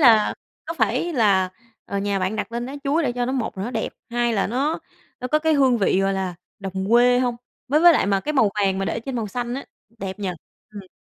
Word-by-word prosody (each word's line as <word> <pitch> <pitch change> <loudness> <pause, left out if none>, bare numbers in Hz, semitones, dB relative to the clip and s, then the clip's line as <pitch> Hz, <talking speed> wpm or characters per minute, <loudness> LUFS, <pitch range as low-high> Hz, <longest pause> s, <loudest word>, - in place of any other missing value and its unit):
là 225 -6 +6 0.3
có 330 - -3
phải 250 +8 0
là, 195 -7 +3 0.3
ờ, 200 - -3
nhà 200 0 0
bạn 190 +3 -1
đặt 210 +1 -4
lên 240 +1 -3
lá 270 - -7
chuối 295 +4 +2
để 250 -5 0
cho 245 0 -1
nó, 260 - -1
một 245 -7 -2
là 195 - -2
nó 240 - -3
đẹp, - - -2 0.2
hai 240 0 +1
là 200 -3 +1
nó 275 +8 0 0.4
nó 250 - -3
có 305 - +3
cái 320 +1 +2
hương 260 -4 +4
vị, 195 -1 +2
gọi 195 0 +2
là, 190 -2 -2 0.2
đồng 195 +1 -4
quê 245 +1 +6
hông? 245 -2 0 0.3
Với 300 +3 +3
với 345 0 +8
lại - - +2
mà 195 -1 +2
cái 300 +9 -2
màu 225 -8 +4
vàng 190 -1 +2
mà 195 - -1
để 195 - -2
trên 265 +1 -5
màu 225 -3 -2
xanh 245 +3 -3
á, 275 - -5 0.3
đẹp 190 0 -5
nhỉ? 200 - -2 0.4
Ừm. 205 -3 -9
235 Hz, 255 wpm, -23 LUFS, 195-260 Hz, 0.4 s, với